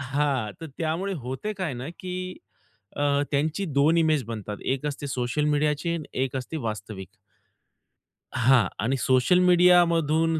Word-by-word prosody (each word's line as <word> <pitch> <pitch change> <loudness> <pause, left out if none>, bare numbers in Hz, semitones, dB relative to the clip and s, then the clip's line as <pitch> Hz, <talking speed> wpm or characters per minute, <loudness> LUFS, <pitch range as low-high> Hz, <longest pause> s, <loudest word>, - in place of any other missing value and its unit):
हां 135 -4 -1
तर 165 - -6
त्यामुळे 170 +5 -1
होते 130 - -4
काय 185 -6 -3
ना, 125 +3 -6
की 185 0 -5 0.6
अ, 145 0 +2
त्यांची 155 +7 0
2 150 +2 +3
इमेज 155 -5 +2
बनतात. 105 -2 -5
एक 135 +2 -1
असते 145 0 -4
सोशल 130 +3 -1
मीडियाची 150 +3 0
आणि 160 -3 -4 0.2
एक 135 0 -4
असते 130 +5 -5
वास्तविक. 100 -3 -6 1.3
हां 125 0 +4 0.2
आणि 135 +3 +1
सोशल 130 +8 +3
मीडियामधून 165 -3 +4
145 Hz, 140 wpm, -25 LUFS, 130-165 Hz, 1.3 s, हां